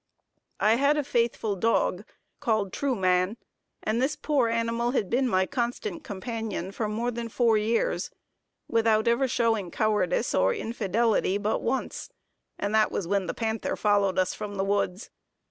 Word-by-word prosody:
I 220 +2 +4
had 280 +3 +3
a 295 - +1
faithful 235 -5 0
dog, 205 -1 +1 0.3
called 215 -7 0
Trueman, 190 -6 +1 0.5
and 220 +3 0
this 285 +4 +1
poor 285 -6 +1
animal 230 +1 0
had 205 -8 -1
been 255 +2 +2
my 190 -5 +2
constant 285 - -3
companion 215 - -4
for 210 +1 -3
more 230 +3 -1
than 235 0 -5
four 230 0 +3
years, 215 +2 0 0.6
without 225 -1 +2
ever 235 +3 +3
showing 225 -6 +1
cowardice 215 - 0
or 485 - +3
infidelity, 225 - 0
but 210 +1 -1
once, 265 - -2 0.5
and 205 +1 -2
that 220 -1 +3
was 185 - -2
when 195 -1 0
the - - -3
panther 220 -1 -2
followed 200 -2 +2
us 185 -1 +2
from 205 -1 -6
the 195 0 -1
woods. 200 0 -1
225 Hz, 155 wpm, -27 LUFS, 200-240 Hz, 0.6 s, I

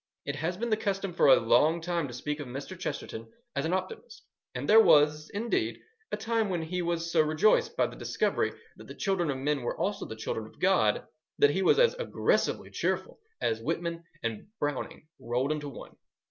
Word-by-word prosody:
It 140 0 -3
has 170 +4 -2
been 235 +2 -2
the 215 - +3
custom 195 -3 -2
for 165 - +4
a 135 - +8
long 145 +9 +3
time 170 -2 -1
to 125 - -9
speak 150 +4 -3
of 145 - -6
Mr. 140 +9 -6
Chesterton 115 - -6 0.2
as 140 - 0
an 165 - 0
optimist; 190 - -5 0.3
and - - -3
there 220 +1 +8
was, 150 -4 +4
indeed, 225 +3 -1 0.3
a - - -1
time 225 -2 0
when 175 -3 -1
he 180 +3 -2
was 170 -1 -2
so 165 - +5
rejoiced 155 +7 +2
by - - +4
the - - -6
discovery - - 0 0.3
that - - -12
the - - -9
children 190 -5 0
of 135 - -1
men 140 +1 0
were 120 - -3
also 200 0 -2
the 110 - -7
children 110 0 -4
of - - -19
God, 180 - +3 0.3
that 145 - +5
he 190 - 0
was 185 - +4
as - - +5
aggressively - - 0
cheerful - - -2 0.2
as 115 0 0
Whitman 170 +4 -3 0.2
and 115 - -3
Browning 145 +1 -3
rolled 125 +4 -1
into 150 -1 -3
one. 140 - -11
160 Hz, 200 wpm, -29 LUFS, 140-190 Hz, 0.3 s, a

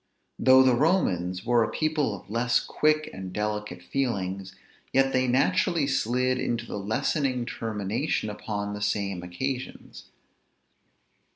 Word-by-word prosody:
Though 130 0 +7
the 130 -1 +4
Romans 95 - +1
were 120 -1 +4
a 110 - -2
people 155 -8 0
of 90 - -13
less 115 +3 +2
quick 155 0 +1
and 95 -1 -7
delicate 105 -1 -3
feelings, 95 -7 -2 0.4
yet 135 0 +3
they 130 0 +2
naturally 155 +4 +2
slid 130 -1 +1
into 120 0 -1
the 105 - -5
lessening 125 +4 0
termination 110 -2 -2
upon 105 -1 -4
the 105 - -6
same 100 -3 -1
occasions. 125 +9 -5
115 Hz, 125 wpm, -27 LUFS, 100-135 Hz, 0.4 s, Though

